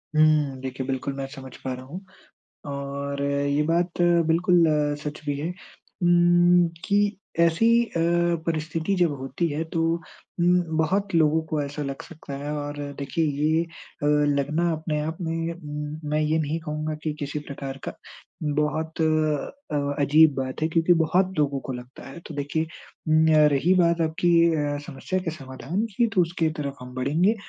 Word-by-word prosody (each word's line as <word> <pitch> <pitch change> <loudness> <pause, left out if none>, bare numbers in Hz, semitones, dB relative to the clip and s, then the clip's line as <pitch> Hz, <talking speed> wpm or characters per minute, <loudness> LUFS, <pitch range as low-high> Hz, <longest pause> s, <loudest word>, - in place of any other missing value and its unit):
हुँ, 155 -3 +3
देखिए, 130 0 -4
बिल्कुल 135 +1 -2
मैं 135 - -3
समझ 135 -1 -10
पा 130 -1 -4
रहा 130 0 -8
हूँ, 165 +8 -7 0.7
और 140 0 -4
ये 140 +1 +1
बात 170 +2 0 0.3
बिल्कुल 170 +1 +4 0.4
सच 150 0 -5
भी 145 -1 -1
है 155 - -2 0.6
उम्, 175 0 +5 0.2
कि 205 0 +2 0.2
ऐसी 170 +6 +4 0.2
अ, 235 - -9 0.5
परिस्थिति 160 +2 -1
जब 175 -4 +3
होती 135 +6 -2
है 155 +1 -2
तो 165 - 0 0.6
उम, 180 +1 +4 0.2
बहुत 190 +4 +1
लोगों 160 0 +4
को 150 -2 0
ऐसा 145 +1 -5
लग 135 -1 -5
सकता 155 -4 -10
है 145 - -3
और 145 0 -5 0.2
देखिए 140 +4 -1
ये 155 +3 +1
अ, 165 -3 -10 0.3
लगना 155 +5 +1
अपने 155 -1 -2
आप 160 +2 -3
में 160 -2 -4
मैं 150 +1 +1
ये 155 +1 +1
नहीं 155 +1 -1
कहूँगा 155 0 -3
कि 155 - -1
किसी 145 0 -3
प्रकार 140 -2 -7
का - - -4 0.5
बहुत, 150 +2 -1
अ, 155 - 0
अजीब 155 +1 +6
बात 130 +2 -4
है 160 - +2
क्योंकि 165 +2 +3
बहुत 185 +4 +2
लोगों 140 -2 +1
को 130 - -3
लगता 125 +2 -10
है। 135 - -9
तो - - -8
देखिए 145 +3 -1 0.4
उम, 155 0 +4
य 155 -1 +6
रही 150 +7 +3
बात 170 -2 +3
आपकी 160 +2 +1 0.3
अ, 145 -1 -1
समस्या 185 +7 -3
के 180 -3 -3
समाधान 155 - -4
की, 235 - +4
तो 200 -4 +2
उसके 165 -1 0
तरफ 140 -1 -3
हम 125 0 -9
बढ़ेंगे, 155 - +2
155 Hz, 165 wpm, -25 LUFS, 140-170 Hz, 0.7 s, अजीब